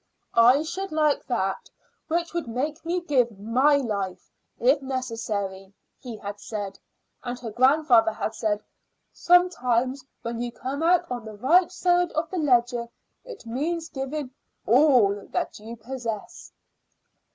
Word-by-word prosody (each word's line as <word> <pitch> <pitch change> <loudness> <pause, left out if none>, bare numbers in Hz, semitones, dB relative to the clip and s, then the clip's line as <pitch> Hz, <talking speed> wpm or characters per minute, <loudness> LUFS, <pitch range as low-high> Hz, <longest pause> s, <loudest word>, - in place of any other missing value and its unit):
"I 245 +5 +6
should 380 +4 -5
like 305 -2 +1
that 195 -6 -2 0.4
which 340 +1 -1
would 340 -6 -3
make 280 +7 -3
me 350 +2 -1
give 250 - +1
my 255 +8 +3
life 200 -9 -3 0.3
if 270 +4 +3
necessary," 215 -7 -4 0.2
he 240 -4 -8
had 205 0 -7
said; 205 -3 -6 0.4
and 245 0 -4
her 235 -3 -7
grandfather 250 -2 +4
had 220 - -4
said, 215 -2 -1 0.5
"Sometimes 265 -8 +2 0.2
when 235 0 -4
you 240 0 -3
come 270 +5 -5
out 350 +1 +4
on 245 -2 -3
the 215 -1 -9
right 345 - +4
side 355 -1 +2
of 315 +1 -2
the 370 - -2
ledger 245 -4 +2 0.3
it 485 - -11
means 320 +8 -2
giving 270 0 -4 0.3
all 230 -6 +4
that - - -3
you 225 +2 -8
possess." 230 -2 -6
255 Hz, 140 wpm, -25 LUFS, 225-310 Hz, 0.5 s, I